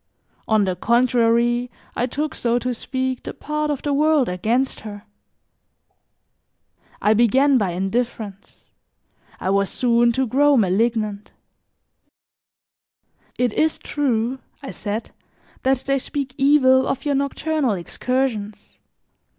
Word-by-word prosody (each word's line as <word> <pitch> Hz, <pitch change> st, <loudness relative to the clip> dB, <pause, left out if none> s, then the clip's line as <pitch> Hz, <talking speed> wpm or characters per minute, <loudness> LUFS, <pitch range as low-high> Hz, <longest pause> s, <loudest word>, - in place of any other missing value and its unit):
On 215 Hz, -2 st, +3 dB
the 185 Hz, -2 st, -1 dB
contrary, 240 Hz, +1 st, +2 dB, 0.3 s
I 245 Hz, -, 0 dB
took, 300 Hz, +4 st, -3 dB
so 235 Hz, 0 st, 0 dB
to 250 Hz, +1 st, -2 dB
speak, 260 Hz, +1 st, -3 dB
the -, -, -7 dB
part 300 Hz, 0 st, -3 dB
of 290 Hz, -3 st, -3 dB
the 290 Hz, -, 0 dB
world 300 Hz, -3 st, +3 dB
against 225 Hz, +9 st, 0 dB
her. 205 Hz, -1 st, -9 dB, 2.0 s
I 210 Hz, -, +3 dB
began 255 Hz, +5 st, +4 dB
by 190 Hz, -5 st, -1 dB
indifference; 200 Hz, +1 st, -4 dB, 0.7 s
I 190 Hz, -, -1 dB
was 200 Hz, 0 st, +1 dB
soon 235 Hz, -1 st, +2 dB
to 265 Hz, +2 st, +1 dB
grow 280 Hz, +4 st, +3 dB
malignant. 215 Hz, 0 st, 0 dB, 2.0 s
"It 245 Hz, -3 st, +1 dB
is 315 Hz, 0 st, +1 dB
true," 255 Hz, -3 st, -1 dB, 0.2 s
I 270 Hz, -, -6 dB
said, 210 Hz, +1 st, -5 dB, 0.5 s
"that 265 Hz, +1 st, +2 dB
they 275 Hz, 0 st, +1 dB
speak 275 Hz, 0 st, -4 dB
evil 265 Hz, -2 st, +4 dB
of 270 Hz, -, -3 dB
your 290 Hz, -, +1 dB
nocturnal 280 Hz, -1 st, 0 dB
excursions. 215 Hz, +2 st, -3 dB
245 Hz, 120 wpm, -21 LUFS, 220-270 Hz, 2.0 s, began